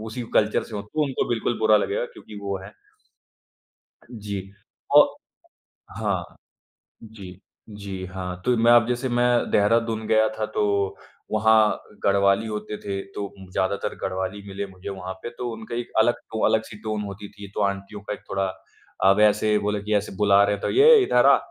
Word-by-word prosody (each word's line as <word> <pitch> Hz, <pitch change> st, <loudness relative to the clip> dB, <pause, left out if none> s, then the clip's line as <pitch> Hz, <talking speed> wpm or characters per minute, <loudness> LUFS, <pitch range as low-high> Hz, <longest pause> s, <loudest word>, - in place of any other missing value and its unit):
उसी 110 Hz, +3 st, -6 dB
कल्चर 105 Hz, 0 st, +3 dB
से 110 Hz, -, -10 dB
हों, 100 Hz, -, -4 dB
तो 150 Hz, +9 st, -2 dB
उनको 135 Hz, -2 st, -2 dB
बिल्कुल 120 Hz, 0 st, -1 dB
बुरा 110 Hz, -1 st, +5 dB
लगेगा 100 Hz, +3 st, -1 dB
क्योंकि 105 Hz, -, -12 dB
वो 100 Hz, -1 st, -3 dB
हैं। 105 Hz, -, -11 dB, 1.4 s
जी, 105 Hz, -4 st, -5 dB, 0.6 s
औ -, -, +10 dB, 1.0 s
हाँ, -, -, -2 dB, 0.7 s
जी, 100 Hz, -4 st, -11 dB, 0.3 s
जी 100 Hz, -3 st, -7 dB
हाँ, 90 Hz, -1 st, -6 dB
तो 125 Hz, -1 st, +3 dB
मैं 115 Hz, +1 st, +4 dB
अब 120 Hz, -1 st, +6 dB
जैसे 125 Hz, +2 st, -1 dB
मैं 120 Hz, 0 st, +2 dB
देहरादून 110 Hz, +1 st, +2 dB
गया 110 Hz, 0 st, +4 dB
था 110 Hz, -, -1 dB
तो -, -, +2 dB, 0.7 s
वहाँ 110 Hz, 0 st, +4 dB, 0.2 s
गढ़वाली 100 Hz, +2 st, +3 dB
होते 105 Hz, 0 st, -5 dB
थे, 100 Hz, -1 st, -4 dB
तो 100 Hz, +1 st, -7 dB, 0.2 s
ज़्यादातर 95 Hz, +1 st, -1 dB
गढ़वाली 95 Hz, +2 st, -3 dB
मिले 100 Hz, +1 st, -4 dB
मुझे 95 Hz, +1 st, -9 dB
वहाँ 95 Hz, -1 st, -6 dB
पे, -, -, -4 dB
तो 120 Hz, 0 st, -5 dB
उनका 110 Hz, +1 st, -7 dB
एक 120 Hz, -, -4 dB
अलग 120 Hz, +2 st, +4 dB, 0.2 s
टो 110 Hz, -, 0 dB
अलग 110 Hz, 0 st, +2 dB
सी 105 Hz, -, -11 dB
टोन 110 Hz, -1 st, -2 dB
होती 100 Hz, 0 st, -7 dB
थी। 100 Hz, -1 st, -11 dB
तो -, -, -1 dB
आंटियों 100 Hz, +1 st, -3 dB
का 105 Hz, +1 st, -5 dB
एक -, -, -8 dB
थोड़ा 95 Hz, 0 st, 0 dB, 0.6 s
अब 95 Hz, +2 st, +5 dB
ऐसे 105 Hz, 0 st, +4 dB
बोले 105 Hz, 0 st, -2 dB
कि 105 Hz, -, -2 dB
ऐसे 105 Hz, 0 st, -1 dB
बुला 100 Hz, -1 st, +5 dB
रहे 105 Hz, 0 st, +2 dB
हैं, 100 Hz, -, -11 dB
तो -, -, -1 dB
"ये 455 Hz, +5 st, +7 dB
इधर 380 Hz, -, +3 dB
आ, -, -, +7 dB
105 Hz, 180 wpm, -24 LUFS, 100-110 Hz, 1.4 s, औ